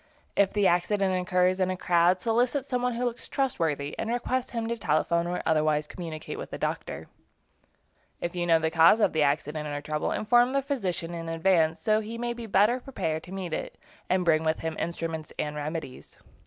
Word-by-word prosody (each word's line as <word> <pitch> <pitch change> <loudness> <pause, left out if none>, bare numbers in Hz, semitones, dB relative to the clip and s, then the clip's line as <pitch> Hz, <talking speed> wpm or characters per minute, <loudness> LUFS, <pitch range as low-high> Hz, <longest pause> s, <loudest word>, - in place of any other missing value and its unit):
If 200 -1 +3
the 205 -1 +1
accident 190 +2 +2
occurs 180 0 +2
in 185 -1 +2
a 185 - -2
crowd, 175 +1 +3
solicit 245 +4 +1
some 250 -3 -1
one 250 0 0
who 245 +1 -1
looks 240 -1 -4
trustworthy, 160 - -1
and - - -2
request 245 +1 -1
him 230 -1 -3
to 235 - -1
telephone 170 -2 +1
or 180 +1 -3
otherwise 155 -1 +2
communicate 160 -1 -7
with - - -7
a - - -3
doctor. - - -4 1.1
If 170 +1 -4
you 175 -1 -1
know 165 -1 +6
the 160 0 -1
cause 165 +6 +6
of 215 - +3
the 160 - +1
accident 150 +1 0
or 145 0 -3
trouble 150 0 -2
inform 240 +4 +3
the 275 0 +1
physician 190 - -2
in 165 -1 -5
advance, 165 -1 +2
so 215 -1 +3
that 215 - -6
he 230 +1 -5
may 240 0 -2
be 235 -1 -8
better 210 +5 +3
prepared 160 -12 -3
to 180 - -12
meet 190 -2 -5
it - - -4 0.3
and 185 -1 +2
bring 160 -1 +3
with 160 0 0
him 160 -1 -3
instruments 165 -2 -4
and 150 0 -2
remedies. 150 -2 -6
180 Hz, 205 wpm, -27 LUFS, 160-225 Hz, 1.1 s, know